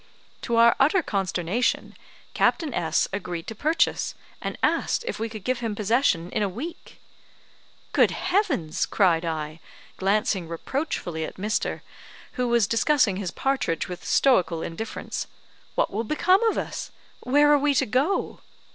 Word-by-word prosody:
To 235 - -1
our 230 0 +6
utter 320 +6 +4
consternation, 195 - -1 0.4
Captain 310 -6 +1
S 160 -5 +1
agreed 180 -4 -4
to - - -6
purchase, 310 - 0 0.3
and - - -4
asked 470 - +1
if - - -3
we 225 +1 -2
could 215 -3 -8
give 255 +1 -1
him 225 -3 -3
possession 210 -5 +1
in - - -1
a 205 - +1
week! 275 - -8 0.9
"Good - - +5
heavens!" 350 - 0
cried 175 -5 +3
I, 155 -1 -4 0.4
glancing 195 -2 +1
reproachfully 170 - -3
at - - -6
Mr., 210 +3 -1 0.5
who 250 -1 -1
was 235 -3 +3
discussing 230 -2 +2
his 195 -3 -3
partridge 265 -8 -1
with 180 -1 -7
stoical 180 -11 +2
indifference. 195 +7 -5 0.5
"What - - +1
will 220 +3 -1
become 365 - +3
of 450 - +2
us? - - -4 0.3
Where 290 +3 +4
are 290 - +5
we 285 0 +2
to - - +3
go?" 270 - 0
220 Hz, 145 wpm, -25 LUFS, 180-275 Hz, 0.9 s, our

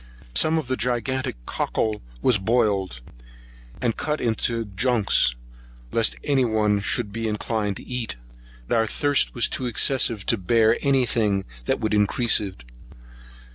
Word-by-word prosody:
Some 160 - +3
of 160 - -2
the 130 - -1
gigantic 125 - -2
cockle 110 -1 -2 0.2
was 120 -6 +3
boiled, 100 - 0 0.8
and 115 -2 +1
cut 150 0 -2
into 115 0 -1
junks, 105 - +2 0.6
lest 115 -1 +1
any 140 -3 +2
one 105 -3 +1
should 105 +1 0
be 115 +2 -3
inclined 105 -1 -2
to - - -11
eat. 125 - -4 0.5
But - - +1
our 110 - +1
thirst 145 +5 +1
was 120 - +3
too 130 - -3
excessive 120 -3 +2
to 115 - +2
bear 110 +4 +3
any 135 -3 +2
thing 105 -5 0 0.2
which - - +1
would 110 -1 -2
increase 105 +3 +3
it. 95 - -7
115 Hz, 145 wpm, -23 LUFS, 105-125 Hz, 0.8 s, Some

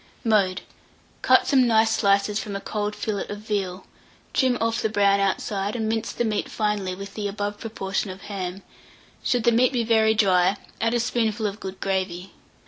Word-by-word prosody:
Mode. 200 -5 +2 0.6
Cut - - +5
some 260 -3 +4
nice 220 -1 +4
slices 200 0 +2
from 205 -2 -5
a - - -2
cold 210 +1 -3
fillet 210 -3 -3
of 205 - -5
veal, 200 -3 -3 0.5
trim 255 -2 +2
off 230 +1 0
the 220 - 0
brown 200 -1 +3
outside, 195 +1 -1
and 220 -2 -1
mince 225 0 -1
the 240 - -1
meat 215 -2 -1
finely 210 -4 -1
with 195 +1 -8
the 210 -2 -3
above 205 0 -4
proportion 195 -3 -3
of 190 +1 -8
ham: 195 -2 -5 0.6
should 245 -2 +1
the 235 - +4
meat 245 +3 +4
be 245 -3 0
very 220 -1 +3
dry, 190 -2 +3 0.2
add 230 +1 +1
a - - +2
spoonful 225 -2 0
of 205 +1 -3
good 190 -2 -7
gravy. 190 -1 -2
210 Hz, 185 wpm, -24 LUFS, 195-225 Hz, 0.6 s, Cut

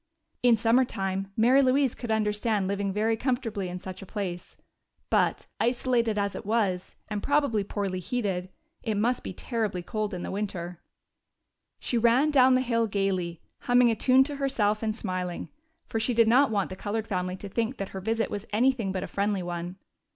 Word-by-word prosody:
In 245 -2 +6
summer 230 +3 +4
time 195 -4 -3
Mary 250 +5 +5
Louise 265 -1 +3
could 240 -3 -5
understand 210 -1 +1
living 200 0 -1
very 215 +3 +1
comfortably 225 -6 -2
in 180 - -5
such 185 +1 -8
a - - -8
place. 180 -4 -5 0.5
But, - - +2
isolated 235 -2 +1
as 200 -1 -1
it - - -6
was, 200 -4 -1
and 210 -1 -3
probably 285 -7 +2
poorly 195 -2 -3
heated, 185 -3 -2 0.3
it 220 -4 -2
must 240 +4 +1
be - - -5
terribly 210 -2 -3
cold 215 +1 -3
in 175 - -5
winter. 180 -4 -4 1.0
She 240 - 0
ran 245 +6 +4
down 260 -2 +6
the 255 - +3
hill 230 -2 +1
gayly, 190 -4 -1 0.2
humming 245 -1 +4
a - - 0
tune 255 +4 +5
to 285 +1 -5
herself 215 -7 +1
and 215 -1 -1
smiling, 185 -5 -4 0.4
for 225 - -2
she 235 +2 0
did 230 -1 +5
not 260 +5 +5
want 200 -4 -1
the - - -4
colored 215 +3 -3
family 185 -2 -2
to 200 - -8
think 230 +6 -2
that 195 - -4
her 190 - -6
visit 225 +3 -1
was 205 +1 -5
anything 230 -2 +2
but 190 - -3
a - - -4
friendly 200 -1 -1
one. 175 +1 -4
215 Hz, 185 wpm, -27 LUFS, 195-240 Hz, 1.0 s, In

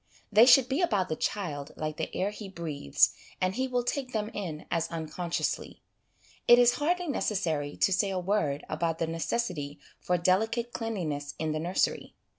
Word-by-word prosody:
They 220 +4 +7
should 255 0 +7
be 270 +6 0
about 205 - +1
the 155 - -1
child 155 -7 -3
like 155 -1 -4
the - - -3
air 195 +2 0
he 210 -1 -8
breathes, 160 - +1 0.3
and 185 0 +1
he 260 +4 -1
will 250 -1 0
take 255 +1 -3
them 215 0 -2
in 170 -7 -5
as 165 -1 +1
unconsciously. 165 +1 -3 0.6
It 240 - +9
is 245 0 +6
hardly 355 +3 +1
necessary 165 - -1
to 195 - +3
say 195 +2 +2
a 190 - -2
word 180 -6 0
about 165 +1 -1
the 165 - 0
necessity 165 -3 -2 0.2
for 180 - 0
delicate 225 +7 +1
cleanliness 160 -11 -3
in 160 0 -1
the 155 - -1
nursery. 175 +4 -1
185 Hz, 175 wpm, -29 LUFS, 160-230 Hz, 0.6 s, It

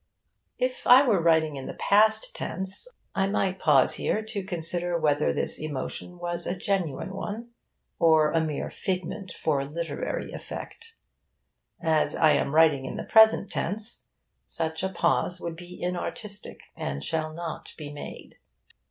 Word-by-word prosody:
If 255 0 -2
I 255 +3 +9
were 210 -8 +3
writing 160 -3 +3
in 135 - -6
the - - -6
past 220 - +3
tense, 190 - -3 0.3
I 195 0 +1
might 190 -2 0
pause 145 -4 +5
here 215 - -1
to 215 -2 -4
consider 175 -1 -1
whether 150 -2 +2
this - - -1
emotion 155 +4 -4
was 175 0 -2
a 180 - -2
genuine 190 -2 -1
one 215 +4 -5 0.5
or 160 -2 +5
a 165 - +2
mere 155 -2 -3
figment 185 0 -3
for 145 -3 0
literary 165 - -4
effect. 455 0 -8 0.8
As 160 -2 +1
I 155 -2 +5
am 145 0 +1
writing 155 -4 +5
in - - -5
the - - -4
present 220 -3 +5
tense, 210 +5 -3 0.4
such 160 -1 -1
a 190 - 0
pause 180 -1 +1
would 170 -2 -5
be 175 +1 -11
inartistic, 185 +3 -4
and 70 0 -4
shall 155 - -1
not 165 0 -6
be 150 -2 -7
made. 145 - -9
175 Hz, 150 wpm, -27 LUFS, 155-200 Hz, 0.8 s, I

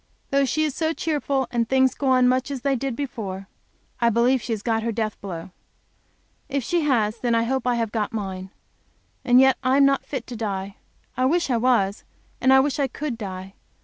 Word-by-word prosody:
Though 275 0 +3
she 310 +4 0
is 305 -3 -1
so 320 +2 -1
cheerful, 285 -5 -1
and 235 -2 0
things 265 -1 +3
go 275 - -3
on 255 -1 +4
much 255 +2 +1
as 275 -3 -4
they 275 0 +1
did 265 -1 -3
before, 205 -8 -5 0.5
I 235 - +3
believe 240 +3 +2
she 235 - -5
has 215 -2 -2
got 225 -2 0
her 230 +1 -1
death 215 -1 -3
blow. 180 -3 -7 1.0
If 280 -2 -1
she 345 +7 0
has, 230 -7 +1
then 240 -2 +1
I 230 - +2
hope 260 +1 -1
I 245 - +2
have 230 -2 -1
got 215 -2 -1
mine. 190 -3 -5 0.7
And 245 0 +5
yet 265 0 +5
I 260 +1 +2
am 280 - +6
not 275 0 +2
fit 265 -5 -5
to 245 - -8
die. 200 -3 -4 0.4
I 255 - +1
wish 335 +1 +1
I 240 - +2
was, 225 -4 +1 0.4
and 260 - +4
I 265 - +7
wish 285 0 -1
I 275 - +2
could 280 0 -4
die. 190 -3 -7
245 Hz, 215 wpm, -23 LUFS, 220-270 Hz, 1.0 s, I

